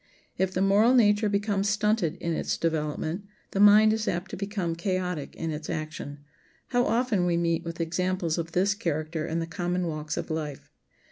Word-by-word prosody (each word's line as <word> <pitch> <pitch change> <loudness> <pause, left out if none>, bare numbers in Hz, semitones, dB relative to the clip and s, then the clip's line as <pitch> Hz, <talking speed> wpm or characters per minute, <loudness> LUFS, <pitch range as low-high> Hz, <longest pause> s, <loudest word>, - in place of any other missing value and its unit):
If 190 0 0
the 185 +1 0
moral 210 +6 +5
nature 210 -2 +4
becomes 200 0 0
stunted 210 -5 +1
in 170 -2 -3
its - - -1
development 160 +3 -2 0.3
the 195 - -2
mind 210 +1 +7
is 220 -1 -2
apt 175 +2 -2
to - - -4
become 195 -4 -2
chaotic 180 -4 -2
in 165 -1 -3
its 155 0 -6
action. 155 -2 -5 0.5
How 245 -1 +2
often 230 -5 +1
we 170 -1 +2
meet 170 -1 0
with 170 0 -6
examples 175 0 -1
of 165 0 -5
this 195 +3 +3
character 155 -5 -2
in 165 - -2
the 165 - -1
common 175 +2 -2
walks 155 -2 -4
of - - -4
life! 150 -3 -5
180 Hz, 185 wpm, -27 LUFS, 160-205 Hz, 0.5 s, mind